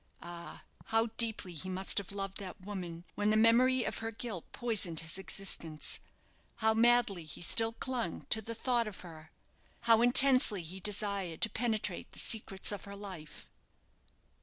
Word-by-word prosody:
Ah! 170 Hz, 0 st, -8 dB, 0.2 s
how 225 Hz, +1 st, +1 dB
deeply 220 Hz, -6 st, 0 dB
he 180 Hz, +4 st, -7 dB
must 190 Hz, +2 st, +2 dB
have 200 Hz, -, -8 dB
loved 195 Hz, -1 st, -3 dB
that 195 Hz, -1 st, -8 dB
woman, 180 Hz, -4 st, -7 dB
when 205 Hz, 0 st, 0 dB
the 215 Hz, -, +3 dB
memory 245 Hz, +3 st, +4 dB
of -, -, -4 dB
her 225 Hz, -, -4 dB
guilt 220 Hz, -5 st, -6 dB
poisoned 205 Hz, -9 st, -2 dB
his 165 Hz, +4 st, -3 dB
existence! 170 Hz, -5 st, -2 dB, 0.6 s
How 220 Hz, 0 st, +2 dB
madly 230 Hz, -5 st, +3 dB
he 155 Hz, -, -10 dB
still 225 Hz, +5 st, +2 dB
clung 250 Hz, 0 st, -3 dB
to 220 Hz, -, +2 dB
the 230 Hz, +2 st, -5 dB
thought 240 Hz, -1 st, 0 dB
of 210 Hz, -, -8 dB
her! 160 Hz, -3 st, -12 dB, 0.5 s
how 230 Hz, -1 st, +4 dB
intensely 245 Hz, -5 st, +6 dB
he 180 Hz, +4 st, -9 dB
desired 200 Hz, -3 st, -2 dB
to 225 Hz, -, +2 dB
penetrate 220 Hz, -6 st, -1 dB
the -, -, -6 dB
secrets 200 Hz, -4 st, +3 dB
of 205 Hz, -2 st, -6 dB
her 200 Hz, 0 st, -9 dB
life! 185 Hz, -6 st, -9 dB
205 Hz, 160 wpm, -32 LUFS, 185-230 Hz, 0.6 s, intensely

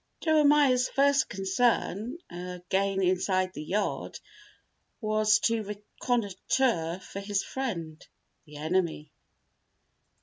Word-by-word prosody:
Jeremiah's 295 Hz, -5 st, +4 dB
first 275 Hz, 0 st, +3 dB
concern, 210 Hz, -, 0 dB
again 180 Hz, +2 st, -2 dB
inside 185 Hz, 0 st, +1 dB
the 150 Hz, -, -6 dB
yard, 200 Hz, +7 st, -2 dB, 0.8 s
was 215 Hz, -1 st, +3 dB
to 230 Hz, -1 st, +1 dB
reconnoitre 205 Hz, -3 st, -1 dB
for 200 Hz, -, -7 dB
his 200 Hz, 0 st, -1 dB
friend, 170 Hz, -12 st, -5 dB, 0.4 s
the 150 Hz, -2 st, -12 dB
enemy. 160 Hz, -1 st, -1 dB
200 Hz, 90 wpm, -28 LUFS, 180-245 Hz, 0.8 s, Jeremiah's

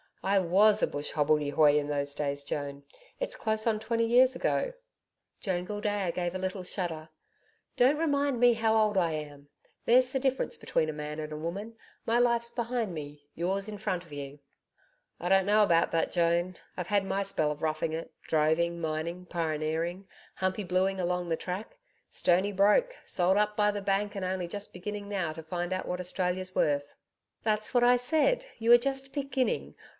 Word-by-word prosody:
I 195 Hz, +1 st, +2 dB
WAS 200 Hz, +4 st, +4 dB
a -, -, +4 dB
bush 145 Hz, +1 st, -4 dB
hobbledehoy 150 Hz, 0 st, +3 dB
in 145 Hz, -, -4 dB
those 145 Hz, -1 st, 0 dB
days, 140 Hz, -1 st, -3 dB
Joan. 140 Hz, 0 st, -4 dB, 0.4 s
It's -, -, -1 dB
close 220 Hz, 0 st, +1 dB
on 220 Hz, -2 st, +2 dB
twenty 230 Hz, +1 st, 0 dB
years 255 Hz, +3 st, +5 dB
ago.' -, -, 0 dB, 0.7 s
Joan 180 Hz, -3 st, -2 dB
Gildea 205 Hz, -2 st, -1 dB
gave 175 Hz, 0 st, -2 dB
a -, -, -2 dB
little 185 Hz, 0 st, -3 dB
shudder. 165 Hz, -4 st, -4 dB, 0.7 s
'Don't 260 Hz, +4 st, +4 dB
remind 285 Hz, -5 st, +1 dB
me 245 Hz, 0 st, +6 dB
how 225 Hz, -1 st, +1 dB
old 215 Hz, -2 st, +3 dB
I 170 Hz, -3 st, +2 dB
am. 145 Hz, -2 st, -7 dB, 0.4 s
There's 255 Hz, +1 st, +4 dB
the 265 Hz, -, 0 dB
difference 265 Hz, 0 st, -1 dB
between 155 Hz, -, 0 dB
a -, -, -3 dB
man 150 Hz, +1 st, -5 dB
and 155 Hz, 0 st, -5 dB
a -, -, -5 dB
woman. 195 Hz, +8 st, -5 dB, 0.3 s
My 230 Hz, +1 st, +2 dB
life's 235 Hz, -1 st, +2 dB
behind 235 Hz, -4 st, -2 dB
me: 145 Hz, -2 st, -8 dB
yours 190 Hz, +4 st, -1 dB
in 210 Hz, -1 st, -6 dB
front 185 Hz, -4 st, -2 dB
of 165 Hz, -, -19 dB
you.' 140 Hz, 0 st, -7 dB, 0.8 s
'I 175 Hz, -, -3 dB
don't 190 Hz, 0 st, +4 dB
know 210 Hz, +1 st, +5 dB
about 170 Hz, -4 st, +3 dB
that, 165 Hz, -, 0 dB
Joan. 175 Hz, +1 st, +1 dB, 0.2 s
I've 180 Hz, -2 st, -4 dB
had 205 Hz, -2 st, +3 dB
my 195 Hz, +1 st, -1 dB
spell 155 Hz, -6 st, 0 dB
of 150 Hz, +1 st, -7 dB
roughing 155 Hz, 0 st, -1 dB
it 165 Hz, +1 st, -5 dB
droving, 160 Hz, +2 st, +1 dB
mining, 165 Hz, +3 st, -3 dB
pioneering 165 Hz, +2 st, -2 dB, 0.3 s
humping 185 Hz, +1 st, -2 dB
bluey 190 Hz, +2 st, +1 dB
along 180 Hz, -1 st, -1 dB
the 165 Hz, -, +2 dB
track 200 Hz, -, -6 dB, 0.3 s
stoney 185 Hz, +3 st, +2 dB
broke: 210 Hz, -, +3 dB
sold 185 Hz, +2 st, +2 dB
up 210 Hz, 0 st, +1 dB
by 210 Hz, 0 st, +3 dB
the 205 Hz, 0 st, -4 dB
bank 200 Hz, +1 st, 0 dB
and 195 Hz, -2 st, -3 dB
only 185 Hz, -1 st, -2 dB
just 205 Hz, +3 st, -6 dB
beginning 205 Hz, +3 st, -6 dB
now 185 Hz, -6 st, -2 dB
to 160 Hz, -, -8 dB
find 175 Hz, +2 st, -3 dB
out 185 Hz, -, -3 dB
what 180 Hz, -, -3 dB
Australia's 185 Hz, 0 st, -2 dB
worth.' 145 Hz, -1 st, 0 dB, 0.5 s
'That's 215 Hz, +1 st, 0 dB
what 245 Hz, -1 st, +4 dB
I 245 Hz, +1 st, +6 dB
said 320 Hz, -, +1 dB
you 230 Hz, +1 st, +3 dB
are 240 Hz, -, +11 dB
just 270 Hz, +1 st, -3 dB
beginning. 275 Hz, -3 st, -1 dB
185 Hz, 185 wpm, -29 LUFS, 165-220 Hz, 0.8 s, are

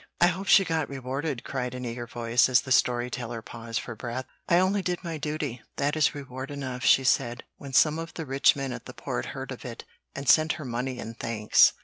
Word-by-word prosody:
"I 175 Hz, -, +6 dB
hope 190 Hz, +3 st, -4 dB
she 195 Hz, -, +7 dB
got 160 Hz, -3 st, -1 dB
rewarded," 135 Hz, 0 st, -3 dB
cried 125 Hz, -2 st, -3 dB
an 125 Hz, 0 st, -5 dB
eager 120 Hz, 0 st, -5 dB
voice, 120 Hz, +2 st, +2 dB
as 125 Hz, -1 st, +5 dB
the 130 Hz, -, -8 dB
story 125 Hz, -1 st, +3 dB
teller 120 Hz, -2 st, -5 dB
paused 115 Hz, -1 st, -5 dB
for 120 Hz, -, -7 dB
breath. 120 Hz, +3 st, -4 dB, 0.2 s
"'I 170 Hz, -, +6 dB
only 190 Hz, +2 st, +3 dB
did 180 Hz, 0 st, -2 dB
my 165 Hz, -3 st, -4 dB
duty; 150 Hz, -5 st, -3 dB
that 145 Hz, +2 st, 0 dB
is 155 Hz, -2 st, +2 dB
reward 130 Hz, -1 st, -6 dB
enough,' 130 Hz, -3 st, -5 dB
she 135 Hz, -, +6 dB
said, 120 Hz, -2 st, +1 dB
when 140 Hz, -1 st, -9 dB
some 155 Hz, +3 st, +4 dB
of 165 Hz, 0 st, -7 dB
the 160 Hz, -, -4 dB
rich 135 Hz, 0 st, +4 dB
men 135 Hz, -2 st, -3 dB
at -, -, -8 dB
the -, -, -10 dB
Port -, -, -3 dB
heard -, -, -6 dB
of -, -, -7 dB
it -, -, -7 dB, 0.3 s
and 140 Hz, 0 st, -6 dB
sent 155 Hz, +4 st, +5 dB
her 155 Hz, -3 st, -7 dB
money 125 Hz, +1 st, -3 dB
and 115 Hz, -1 st, -7 dB
thanks. 110 Hz, -2 st, +4 dB
130 Hz, 230 wpm, -27 LUFS, 120-155 Hz, 0.3 s, she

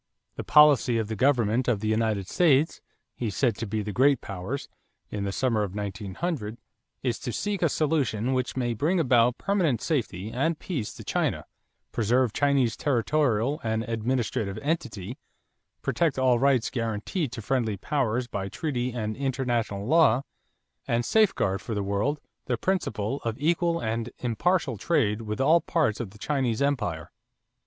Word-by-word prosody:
"The -, -, -5 dB
policy 145 Hz, -5 st, +5 dB
of 110 Hz, -2 st, -2 dB
the 110 Hz, -, -2 dB
Government 120 Hz, -1 st, +2 dB
of 120 Hz, -5 st, +2 dB
the 110 Hz, -, -3 dB
United 110 Hz, -3 st, 0 dB
States," 155 Hz, -, +3 dB, 0.3 s
he 115 Hz, -, -3 dB
said 115 Hz, +3 st, +1 dB
to 115 Hz, -, -4 dB
the 105 Hz, 0 st, -2 dB
great 135 Hz, +4 st, +4 dB
powers, 100 Hz, +8 st, -5 dB, 0.4 s
in 100 Hz, -1 st, -3 dB
the 100 Hz, -, -1 dB
summer 115 Hz, 0 st, +1 dB
of 100 Hz, -2 st, -3 dB
1900, 105 Hz, -, -4 dB, 0.5 s
"is 120 Hz, -4 st, -1 dB
to 125 Hz, -, -4 dB
seek 205 Hz, -, -2 dB
a 170 Hz, -, +3 dB
solution 135 Hz, -7 st, 0 dB
which 130 Hz, 0 st, -1 dB
may 120 Hz, -2 st, 0 dB
bring 160 Hz, -, +1 dB
about 125 Hz, -5 st, +3 dB
permanent 180 Hz, -, +1 dB
safety 110 Hz, -, -2 dB
and 150 Hz, +7 st, 0 dB
peace 145 Hz, -, -4 dB
to -, -, -9 dB
China, -, -, -1 dB, 0.5 s
preserve 120 Hz, +1 st, +1 dB
Chinese 140 Hz, -5 st, +2 dB
territorial 140 Hz, 0 st, +1 dB
and 110 Hz, 0 st, -1 dB
administrative 115 Hz, -3 st, -1 dB
entity, 125 Hz, -, -3 dB, 0.6 s
protect 165 Hz, -6 st, +1 dB
all 130 Hz, -2 st, +3 dB
rights 135 Hz, -3 st, +2 dB
guaranteed 115 Hz, -, -2 dB
to 125 Hz, -, -5 dB
friendly 115 Hz, -4 st, 0 dB
powers 125 Hz, 0 st, 0 dB
by 95 Hz, -5 st, -4 dB
treaty 125 Hz, -, -2 dB
and 110 Hz, -3 st, -3 dB
international 120 Hz, -7 st, -1 dB
law, 140 Hz, -3 st, +4 dB, 0.6 s
and 120 Hz, 0 st, +1 dB
safeguard 195 Hz, -, +2 dB
for 110 Hz, -, -4 dB
the 100 Hz, -, -1 dB
world 100 Hz, +10 st, 0 dB, 0.3 s
the 120 Hz, -, -1 dB
principle 135 Hz, -, -1 dB
of 115 Hz, -1 st, -2 dB
equal 170 Hz, +2 st, +1 dB
and 115 Hz, +1 st, -2 dB
impartial 130 Hz, -, 0 dB
trade 115 Hz, -, +1 dB
with 105 Hz, -1 st, -4 dB
all 160 Hz, +5 st, +5 dB
parts 155 Hz, -11 st, 0 dB
of 120 Hz, -5 st, -4 dB
the 105 Hz, -, -16 dB
Chinese 130 Hz, -3 st, -1 dB
empire." 105 Hz, -, -1 dB
120 Hz, 155 wpm, -26 LUFS, 110-145 Hz, 0.6 s, policy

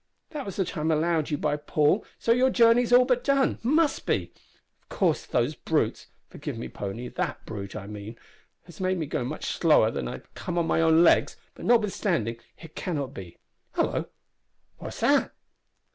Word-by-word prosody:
That 295 Hz, -7 st, -5 dB
was 195 Hz, -, -5 dB
the 190 Hz, -, 0 dB
time 160 Hz, -3 st, -2 dB
allowed 160 Hz, 0 st, +1 dB
you 150 Hz, -, -1 dB
by 150 Hz, 0 st, 0 dB
Paul, 150 Hz, +6 st, +1 dB
so 230 Hz, -, 0 dB
your 250 Hz, +2 st, +4 dB
journey's 235 Hz, 0 st, +4 dB
all 250 Hz, +1 st, +7 dB
but 250 Hz, -1 st, +1 dB
done 275 Hz, -1 st, +2 dB
must 300 Hz, +6 st, +1 dB
be. -, -, -1 dB, 0.5 s
Of -, -, -40 dB
course 175 Hz, -6 st, 0 dB
those 125 Hz, +4 st, 0 dB
brutes 150 Hz, -7 st, -1 dB, 0.2 s
forgive -, -, -7 dB
me, 65 Hz, -, -6 dB
pony, 100 Hz, -, -5 dB
that -, -, -4 dB
brute, 100 Hz, -3 st, -7 dB
I 105 Hz, -2 st, -6 dB
mean 105 Hz, +2 st, -8 dB, 0.5 s
has 175 Hz, -3 st, -15 dB
made 185 Hz, 0 st, +1 dB
me 160 Hz, -, -2 dB
go 140 Hz, -, -2 dB
much 145 Hz, +5 st, -5 dB
slower 150 Hz, -9 st, +3 dB
than 65 Hz, -, -3 dB
if -, -, -4 dB
I -, -, -5 dB
had -, -, -12 dB
come 175 Hz, -, -5 dB
on 170 Hz, -, +2 dB
my 165 Hz, -, +1 dB
own 160 Hz, +1 st, +5 dB
legs, -, -, +4 dB, 0.2 s
but -, -, -10 dB
notwithstanding, 195 Hz, -, +1 dB, 0.2 s
it 165 Hz, -2 st, -13 dB
cannot 145 Hz, -7 st, -3 dB
be 90 Hz, -8 st, -10 dB, 0.4 s
hallo! -, -, 0 dB, 0.7 s
what's -, -, -8 dB
that!" -, -, +2 dB
160 Hz, 190 wpm, -26 LUFS, -, 0.7 s, all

